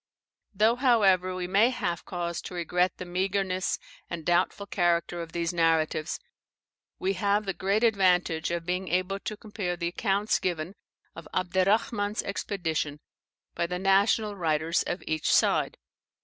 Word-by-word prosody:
Though, 220 +4 +3
however, 195 -8 +3
we 180 -1 -3
may 200 +6 +4
have 175 -9 -3
cause 170 -2 -3
to 180 - -8
regret 180 +1 0
the 180 - -6
meagreness 185 +1 -1 0.3
and 165 -2 -5
doubtful 180 +3 +1
character 175 -2 0
of 165 -1 -7
these 170 0 -2
narratives, 165 -1 +1 0.8
we 190 +1 0
have 205 +2 +1
the 195 - -1
great 200 +5 0
advantage 180 -7 +2
of 170 -1 -3
being 180 +2 -2
able 185 +2 0
to 215 +1 -5
compare 205 -5 -4
the 170 0 -1
accounts 200 +3 0
given 175 0 -2 0.4
of 165 -1 -9
Abderrahman's 205 +3 +1
expedition 165 -7 -2 0.5
by 170 - -1
the 180 +1 -3
national 200 +3 +2
writers 160 -2 +1
of 175 - -3
each 155 -1 0
side. - - +3
185 Hz, 145 wpm, -28 LUFS, 170-200 Hz, 0.8 s, may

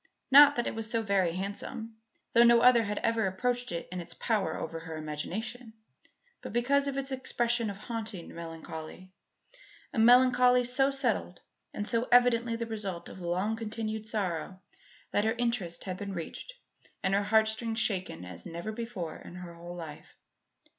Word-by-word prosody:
Not 290 +1 +9
that 240 - 0
it - - -2
was 225 -1 -3
so 230 -1 0
very 195 -5 +2
handsome 220 +4 -4 0.4
though 235 - +6
no 235 0 +7
other 250 -1 +7
had 205 0 -3
ever 230 -3 +2
approached 245 +5 -1
it 170 -1 -4
in 180 - -4
its 170 - -10
power 205 -8 0
over 165 +1 -5
her 160 -1 -7
imagination 215 +10 -5 0.7
but - - -7
because 275 +4 +2
of 275 -1 -2
its 275 0 -2
expression 240 -3 0
of 200 - -6
haunting 215 -4 -6
melancholy, 165 +2 -8 0.8
a 245 - -1
melancholy 250 +1 +6
so 255 +3 +2
settled 250 -9 -1 0.3
and 205 - -4
so 235 +1 0
evidently 240 -1 +4
the 230 0 -3
result 205 -6 -5
of - - -10
long 185 +5 -1
continued 220 -1 -4
sorrow 185 -4 -2 0.5
that 205 - +2
her 220 +1 +2
interest 235 -8 -1
had 185 -1 -4
been 200 0 -5
reached 175 - -7 0.5
and 190 - +1
her 200 - +3
heartstrings 220 +2 +1
shaken 185 - -1
as 90 -1 -9
never 170 +6 -5
before 215 -8 -5
in - - -11
her 180 -1 -8
whole 170 +1 -9
life. 160 -4 -9
220 Hz, 165 wpm, -30 LUFS, 180-240 Hz, 0.8 s, Not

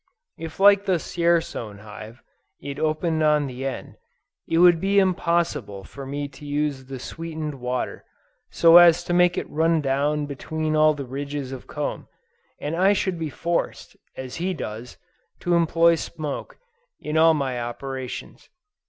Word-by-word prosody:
If 165 +1 -8
like 200 0 +6
the 185 -2 +3
Dzierzon 165 - -1
hive, 110 +3 -11 0.4
it 140 0 -7
opened 155 +1 0
on 150 -1 +3
the 130 0 -4
end, 135 - -7 0.5
it 165 - 0
would 175 -1 +6
be 200 +1 +1
impossible 170 - +1
for 135 +7 -10
me 145 +1 -3
to 135 +1 -15
use 145 -2 -2
the 135 0 -7
sweetened 155 +1 -6
water, 125 +1 -3 0.5
so 165 0 +7
as 175 -1 +7
to 175 - -2
make 175 0 +4
it - - -2
run 165 +1 +2
down 145 +1 0
between 155 +2 -3
all 155 0 +4
the 140 -2 -6
ranges 140 +1 -5
of 130 -2 -8
comb, 150 -1 -4 0.5
and 150 +3 -3
I 190 +4 +4
should 190 -3 -1
be 160 -2 -3
forced, 170 +4 -3 0.2
as 130 -1 -6
he 180 +2 -2
does, 115 -3 -7 0.4
to 175 - 0
employ 170 0 +4
smoke, 155 -2 -5 0.4
in 150 - -5
all 160 0 +6
my 130 -4 -2
operations. 130 +2 -6
150 Hz, 155 wpm, -24 LUFS, 135-170 Hz, 0.5 s, so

